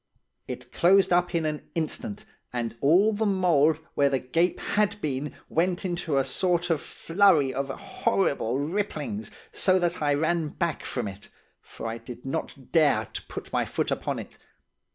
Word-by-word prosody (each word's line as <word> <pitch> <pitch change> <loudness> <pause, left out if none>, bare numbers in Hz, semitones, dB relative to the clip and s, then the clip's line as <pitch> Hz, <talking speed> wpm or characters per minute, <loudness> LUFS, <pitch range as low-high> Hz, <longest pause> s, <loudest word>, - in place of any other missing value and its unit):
It - - -7
closed 190 +1 +4
up 175 0 +2
in 165 -1 +1
an 150 -1 -3
instant, 205 - -3 0.3
and 120 -2 -3
all 185 +10 +5
the 215 +2 -1
mould 165 -6 +3 0.2
where 140 0 +3
the 135 -1 +1
cape 165 +8 +1
had 210 0 0
been 145 -4 -2 0.2
vent 180 +3 0
into 175 -5 -1
a 135 - +4
sort 175 +3 0
of 160 - +1
flurry 165 -7 +3
of 135 +1 -2
horrible 135 -3 0
ripplings, 205 +7 -2 0.2
so 185 -1 +3
that 175 -2 0
I 145 -1 +3
ran 160 +2 +1
back 165 +2 -2
from 120 -5 -2
it; 100 +1 -9 0.3
for - - -10
I 115 +1 -3
did 120 +2 -10
not 135 -1 -5
dare 145 -10 +4
to - - -4
put - - -8
my - - +2
foot - - -2
upon - - -1
it. - - -9
165 Hz, 170 wpm, -27 LUFS, 140-185 Hz, 0.3 s, all